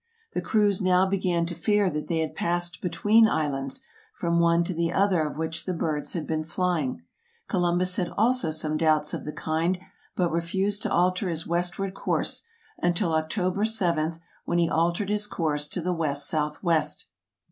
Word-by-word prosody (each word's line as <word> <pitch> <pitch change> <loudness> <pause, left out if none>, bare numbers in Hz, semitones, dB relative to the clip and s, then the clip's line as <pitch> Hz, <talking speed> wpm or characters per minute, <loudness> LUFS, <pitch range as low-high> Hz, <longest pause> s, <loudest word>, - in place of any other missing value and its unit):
The - - -1
crews 210 -2 +2
now 185 0 +4
began 185 -3 0
to 175 - -2
fear 205 +2 +2
that 150 0 -4
they 165 -2 0
had 160 - -3
passed 175 +1 -1
between 215 +5 +4
islands, 135 -5 -2 0.3
from 170 -1 0
one 170 0 +4
to 185 - -2
the 170 0 0
other 190 -2 +2
of 150 -1 -3
which 160 0 -3
the 185 - -2
birds 155 -3 -2
had 165 -4 -3
been 155 -1 -1
flying. 160 - -1 0.4
Columbus 180 0 +1
had 180 - 0
also 245 -3 +3
some 155 0 -1
doubts 155 -2 +2
of - - -4
the 150 - -3
kind, 160 +4 -1 0.4
but 175 -2 +1
refused 190 +5 0
to - - -1
alter 185 +2 +2
his 165 -1 -2
west 175 +1 -1
ward 195 -1 -3
course, - - 0 0.4
until 175 0 +1
October 180 +5 0
7, 170 -8 +1 0.3
when 170 - -1
he 170 -1 +3
altered 170 +5 0
his 210 0 0
course 150 -6 -1
to 180 - -2
the 180 +2 -1
west 145 -4 0
southwest. 155 +2 0
170 Hz, 180 wpm, -26 LUFS, 160-185 Hz, 0.4 s, now